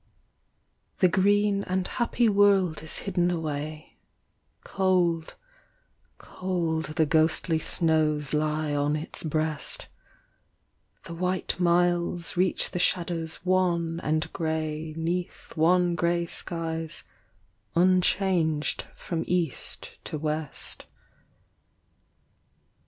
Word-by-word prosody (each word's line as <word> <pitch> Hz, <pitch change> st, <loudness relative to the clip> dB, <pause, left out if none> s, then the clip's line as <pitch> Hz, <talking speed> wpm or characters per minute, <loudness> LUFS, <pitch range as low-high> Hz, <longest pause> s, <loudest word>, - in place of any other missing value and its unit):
The 185 Hz, -, +5 dB
green 200 Hz, +2 st, +2 dB
and 185 Hz, 0 st, -1 dB
happy 235 Hz, +1 st, +1 dB
world 200 Hz, -6 st, +3 dB
is 160 Hz, -, -6 dB
hidden 175 Hz, -3 st, +1 dB
away 155 Hz, -2 st, -4 dB
i -, -, -39 dB, 0.7 s
Cold, 180 Hz, -4 st, +1 dB, 0.8 s
cold, 170 Hz, -4 st, -2 dB
the 160 Hz, -, +3 dB
ghostly 160 Hz, +1 st, +2 dB
snows 155 Hz, -3 st, +1 dB
lie 150 Hz, 0 st, 0 dB
on 145 Hz, +1 st, +1 dB
its 155 Hz, +1 st, -2 dB
breast; 155 Hz, -1 st, -1 dB, 1.1 s
The 170 Hz, -, -8 dB
white 180 Hz, +2 st, -1 dB
miles 175 Hz, 0 st, +2 dB
reach 185 Hz, +1 st, +1 dB
the 180 Hz, -, -3 dB
shadows 170 Hz, -2 st, 0 dB
wan 170 Hz, -3 st, +1 dB
and 155 Hz, +1 st, -1 dB
grey 155 Hz, -1 st, -2 dB
'Neath 175 Hz, +2 st, -3 dB
wan 175 Hz, +2 st, +3 dB
grey 170 Hz, +1 st, +1 dB
skies 165 Hz, -2 st, -4 dB, 0.7 s
unchanged 180 Hz, -3 st, +2 dB
from 165 Hz, -2 st, -3 dB
east 175 Hz, -5 st, -2 dB
to -, -, -4 dB
west. 155 Hz, 0 st, -2 dB
170 Hz, 95 wpm, -27 LUFS, 155-180 Hz, 1.1 s, The